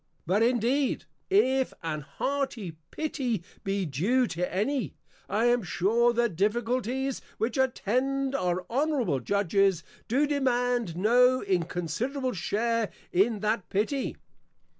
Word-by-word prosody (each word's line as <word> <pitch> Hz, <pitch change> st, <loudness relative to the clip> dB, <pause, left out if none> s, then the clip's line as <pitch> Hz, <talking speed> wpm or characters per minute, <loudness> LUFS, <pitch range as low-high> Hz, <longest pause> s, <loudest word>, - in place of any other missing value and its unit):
_ -, -, -47 dB, 0.2 s
But 190 Hz, +6 st, +2 dB
indeed, 245 Hz, +4 st, +1 dB, 0.2 s
if 265 Hz, -10 st, +3 dB
an 155 Hz, -2 st, -2 dB
hearty 250 Hz, -, -3 dB, 0.2 s
pity 255 Hz, -, -2 dB, 0.2 s
be 195 Hz, -1 st, -1 dB
due 195 Hz, -, +2 dB
to 180 Hz, +1 st, -2 dB
any, 240 Hz, +5 st, -1 dB, 0.3 s
I 215 Hz, +4 st, +1 dB
am 240 Hz, 0 st, +4 dB
sure, 210 Hz, +7 st, +2 dB
the 235 Hz, 0 st, +2 dB
Difficulties 240 Hz, +6 st, -1 dB, 0.2 s
which 225 Hz, +1 st, -1 dB
attend 265 Hz, +2 st, 0 dB
our 180 Hz, -5 st, -1 dB
Honourable 255 Hz, -, +1 dB
Judges, 195 Hz, +2 st, +2 dB, 0.2 s
do 270 Hz, +6 st, +2 dB
demand 245 Hz, -, 0 dB
no 250 Hz, +5 st, +4 dB
Inconsiderable 195 Hz, -, -1 dB
share 220 Hz, +5 st, 0 dB, 0.2 s
in 205 Hz, +3 st, +2 dB
that 215 Hz, -1 st, -1 dB
Pity. 215 Hz, +8 st, -1 dB
230 Hz, 120 wpm, -28 LUFS, 195-260 Hz, 0.3 s, am